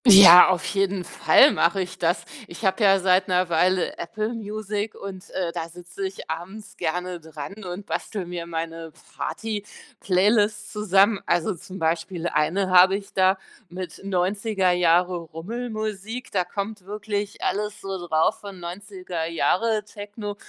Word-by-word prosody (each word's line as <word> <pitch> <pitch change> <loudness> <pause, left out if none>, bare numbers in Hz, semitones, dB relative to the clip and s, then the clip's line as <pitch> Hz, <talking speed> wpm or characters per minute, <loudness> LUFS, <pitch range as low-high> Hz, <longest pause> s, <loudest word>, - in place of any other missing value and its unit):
Ja, 190 -4 +11
auf 185 -2 0
jeden 195 -1 0
Fall 280 +10 +5
mache 170 +3 +1
ich 185 -1 -4
das. 175 +1 0 0.2
Ich 175 +5 -8
habe 190 +3 +1
ja 195 -1 +5
seit 185 0 +3
'ner 180 -1 +1
Weile 180 +2 +1
Apple 215 +7 -3
Music 210 -1 -4
und, 195 -1 -9
äh, 175 -3 -2
da 165 0 -5
sitze 175 +3 -6
ich 190 - -10
abends 190 +6 -7
gerne 180 +2 -3
dran 160 +6 -9
und 180 +2 -6
bastele 205 -3 -4
mir 175 -1 -6
meine 165 -1 -5 0.2
Party-Playlists 205 +2 -1
zusammen. 205 0 +3
Also 175 +1 +1
zum 185 +2 -10
Beispiel 170 +1 -1
1 185 +6 0
habe 185 +1 +7
ich 200 0 -7
da 190 0 +3 0.3
mit 180 +1 -7
90er 195 +1 0
Jahre 180 +1 +3
Rummelmusik, 215 +6 -5
da 185 -3 0
kommt 200 +2 -5
wirklich 205 0 -4
alles 210 +1 -2
so 190 -3 -6
drauf 160 +6 +2
von 200 -2 -10
90er 180 -1 -6
Jahre 210 +6 +1
Techno, 205 0 -7
190 Hz, 145 wpm, -24 LUFS, 175-205 Hz, 0.3 s, Ja